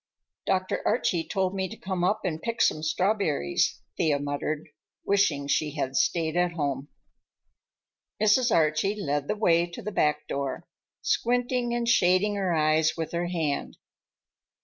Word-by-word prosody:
"Dr. 185 0 0
Archie 170 -2 +1
told 190 -2 0
me 190 -1 -2
to 225 - -9
come 185 -2 -3
up 200 +4 +1
and 160 -3 -2
pick 230 -1 -3
some 155 - +3
strawberries," 160 - 0 0.2
Thea 150 -3 +2
muttered, 145 +2 -3 0.4
wishing 180 -8 +2
she 150 +1 0
had 135 -2 -2
stayed 165 +1 +1
at 175 -1 +1
home. 140 -4 -2 1.3
Mrs. 225 +3 +3
Archie 165 +6 +2
led 145 -5 -1
the 210 - 0
way 175 -5 +3
to 170 - -9
the 210 - -4
back 150 -6 +1
door, 140 -1 -3 0.4
squinting 245 0 0
and 240 -1 -1
shading 195 -2 +3
her 195 -3 -1
eyes 155 0 +2
with 160 -1 -3
her 175 +1 -1
hand. 160 -5 -2
175 Hz, 150 wpm, -27 LUFS, 155-200 Hz, 1.3 s, some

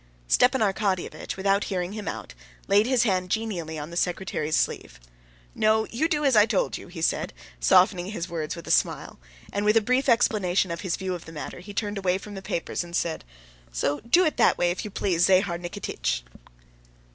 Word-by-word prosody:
Stepan 250 - +4
Arkadyevitch, 195 -4 -1
without 195 +1 +1
hearing 180 -1 -3
him 215 -1 -6
out, - - -5 0.3
laid 205 +3 +4
his 255 -2 +3
hand 185 -5 0
genially 185 -7 -2
on 150 +2 -6
the - - -8
secretary's 175 -3 -1
sleeve. - - -2 0.5
"No, 220 0 +2
you 280 +8 +1
do 300 -2 0
as 270 -4 +4
I 210 0 +6
told 205 -4 0
you," - - -8
he 170 -2 -7
said, - - 0 0.3
softening 180 - +4
his 185 -4 -4
words 160 -3 -4
with 170 - -9
a - - -3
smile, - - 0 0.3
and 200 - -1
with 210 +2 +4
a - - +8
brief 255 +5 +1
explanation 195 -6 +2
of 170 - -4
his 185 -4 -1
view 190 -1 -3
of 175 - -7
the 160 - -10
matter 155 +2 -7
he 195 +4 -10
turned 205 -1 -2
away 185 -1 +1
from 205 +2 -10
the 195 - -7
papers, 170 -1 -3
and 170 0 -8
said: 165 -2 -1 0.5
"So 140 - -1
do 305 - +3
it 310 - 0
that - - +4
way, 175 0 +2
if 180 - -4
you 210 - -5
please, 175 -3 +1
Zahar 185 -2 +3
Nikititch." 60 - -3
190 Hz, 205 wpm, -26 LUFS, 170-215 Hz, 0.5 s, a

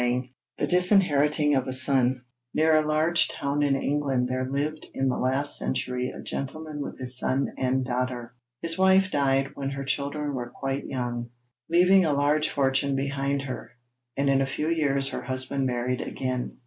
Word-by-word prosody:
] 125 +1 -3
THE - - 0
DISINHERITING 155 -6 +4
OF 130 -2 +1
A - - -2
SON 130 -1 +3 0.3
Near 160 0 +4
a 155 0 +1
large 160 +3 +2
town 140 +1 -2
in 140 -1 +3
England 135 -2 0
there 130 0 -2
lived 150 +3 -3
in 135 0 +1
the 125 - 0
last 135 +3 0
century 125 -1 -2
a - - -9
gentleman 150 +2 -5
with - - -6
his 125 0 -2
son 135 +2 0
and 130 0 0
daughter. 125 -1 -3 0.3
His 165 +2 -1
wife 190 0 +4
died 135 -1 +1
when 135 -1 -4
her 140 0 -4
children 145 +2 -2
were 120 -2 -4
quite 135 +2 -4
young, 120 -2 -3 0.4
leaving 180 +3 +5
a 155 -3 +1
large 145 +2 +2
fortune 135 0 +1
behind 140 0 -1
her, 130 -2 -7 0.4
and 140 0 +1
in 135 0 +3
a 135 - +1
few 150 +4 -2
years 140 -4 +1
her - - -4
husband 130 +1 -2
married 125 +1 -1
again. 130 -1 -4
135 Hz, 175 wpm, -26 LUFS, 130-150 Hz, 0.4 s, leaving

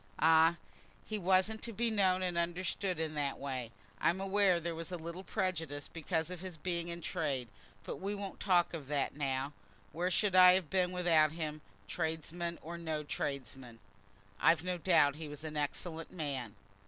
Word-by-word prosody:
"Ah! 160 +1 +6 0.5
he 215 -1 -3
wasn't 190 +4 +2
to 235 - -3
be 230 +1 0
known 185 -3 +3
and 180 -1 -1
understood 175 +1 -1
in 160 -1 -2
that 145 -2 -1
way. 130 -4 -4 0.3
I'm 175 +3 +2
aware 195 -2 +3
there 170 0 -3
was 165 +2 -5
a 180 - -2
little 170 +3 -6
prejudice, 165 -9 -2
because 165 0 -2
of 180 -2 -6
his 185 -3 -7
being 170 +1 -2
in 170 0 -5
trade, 145 -9 -2 0.4
but - - -5
we 200 +2 -3
won't 200 -1 -6
talk 180 -3 +3
of 150 -5 -6
that 145 -1 -1
now. 135 0 -1 0.4
Where 175 +4 -1
should 195 +1 +2
I 180 0 +9
have 185 -5 0
been 180 -1 +2
without 165 -4 +3
him, 155 -2 -4 0.3
tradesman 165 - -3
or 170 +2 -6
no 160 -2 -2
tradesman?" 130 -4 -4 0.6
"I've 165 0 +4
no 180 -1 -2
doubt 150 -5 +4
he 160 -1 -6
was 150 +1 -8
an 155 -1 -5
excellent 160 +3 -3
man." 135 - -4
170 Hz, 180 wpm, -34 LUFS, 150-185 Hz, 0.6 s, I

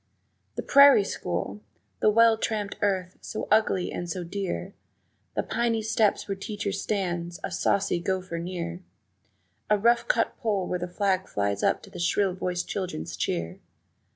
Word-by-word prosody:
The - - -3
prairie 280 -6 +7
school! 95 - -4 0.4
The - - +4
well 230 +1 +6
tramped 215 -2 -2
earth, 190 -2 -1
so 215 - -5
ugly 210 -4 +3
and 175 - -4
so 180 +1 -3
dear, 190 +1 -4 0.6
The - - +1
piney 230 -2 0
steps 220 -1 +1
where 200 - -1
teacher 200 +1 -4
stands, 175 -3 -2
a - - -3
saucy 195 -3 +1
gopher 185 -1 -2
near, 170 0 -5 0.9
A 210 - +5
rough 235 +3 +3
cut - - +1
pole 210 -6 0
where 180 - -2
the 180 - -3
flag 190 0 0
flies 100 0 -1
up - - +1
to - - -13
a - - -7
shrill 190 +2 +2
voiced 180 -1 -3
children's 180 - -4
cheer. 85 0 -2
190 Hz, 155 wpm, -27 LUFS, 175-210 Hz, 0.9 s, prairie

